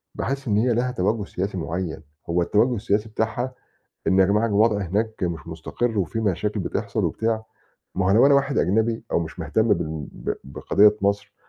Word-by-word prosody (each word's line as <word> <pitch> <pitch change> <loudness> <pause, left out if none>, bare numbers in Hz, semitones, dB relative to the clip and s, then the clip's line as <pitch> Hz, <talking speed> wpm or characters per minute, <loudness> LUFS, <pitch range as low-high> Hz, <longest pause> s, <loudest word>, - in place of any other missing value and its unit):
باحس 135 0 -3
إن 105 -2 +2
هي 120 +2 +3
لها 125 +2 0
تَوجّه 105 -1 0
سياسي 95 0 -3
معيّن، 80 -1 -4 0.3
هو 85 +1 +2
التَوجّه 110 +8 +2
السياسي 105 0 -1
بتاعها 110 +4 -2 0.5
إن 95 - +3
يا 95 - +7
جماعة 105 +4 +2
الوضع 105 +1 +3
هناك 105 +4 -2
مش 85 -1 -4
مُستقر، 105 +8 -2
وفي 100 +5 -1
مشاكل 105 +1 -1
بتحصل - - -2
وبتاع 110 0 -1 0.5
ما 95 0 0
هو - - +3
لو 115 +6 +6
أنا 140 - +5
واحد 140 0 +2
أجنبي 110 +5 +1
أو - - +2
مش 80 +2 -6
مهتم 110 +9 +1
بال 80 -3 -4
بق - - -4
بقضية 105 +9 +3
مصر 100 0 0
105 Hz, 185 wpm, -23 LUFS, 90-115 Hz, 0.5 s, يا